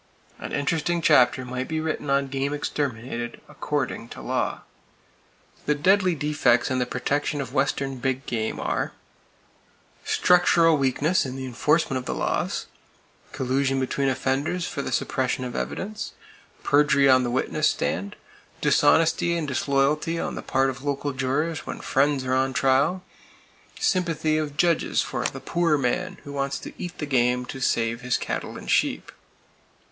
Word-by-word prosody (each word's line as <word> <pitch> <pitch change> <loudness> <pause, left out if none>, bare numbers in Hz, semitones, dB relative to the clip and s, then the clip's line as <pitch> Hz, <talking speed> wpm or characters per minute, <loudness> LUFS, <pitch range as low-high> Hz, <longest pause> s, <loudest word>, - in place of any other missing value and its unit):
An - - -6
interesting 160 +4 0
chapter 130 -5 +4
might 125 +1 -4
be 160 0 -2
written 155 -2 -3
on 140 0 +2
game 135 +1 -2
exterminated 120 -5 -3
according - - -3
to - - -9
law. - - -2 1.1
The 150 - +3
deadly 185 +3 +3
defects 135 -5 +2
in 130 - +1
the 125 - 0
protection 145 +3 -1
of 130 -2 -5
western 135 -1 0
big 130 +1 -2
game 110 -2 -2
are: - - -2 1.1
Structural 175 -2 +4
weakness 145 +5 +1
in 130 -1 -5
the 135 0 -5
enforcement 135 +2 +1
of 125 - -9
the - - -3
laws; - - -1 0.7
Collusion 135 +1 0
between 135 +1 0
offenders 135 +7 -1
for 140 - -4
the - - -4
suppression 130 0 -1
of 125 - -5
evidence; 70 - -4 0.5
Perjury 140 -1 +4
on 130 -1 +6
the 125 - -1
witness 130 +2 +1
stand; 100 +3 -2 0.4
Dishonesty 165 +1 +3
and 160 -3 -2
disloyalty 140 +4 +1
on - - -3
the - - -5
part 135 0 +1
of 125 +1 -11
local 145 0 -2
jurors 140 +5 -1
when - - -5
friends, 140 -1 +1
are 130 - 0
on 130 0 +1
trial; 140 +8 +2 0.8
Sympathy 165 -4 +1
of 145 -2 -4
judges 170 0 +2
for - - -3
"the - - -2
poor 170 -3 +1
man" 180 +9 -1
who 145 - -8
wants 140 -1 -1
to - - -8
eat 175 0 -6
the 150 - -3
game 125 -2 +1
to 135 - -7
save 115 -2 0
his 125 0 0
cattle - - -4
and - - -5
sheep. - - +1
140 Hz, 155 wpm, -25 LUFS, 130-155 Hz, 1.1 s, on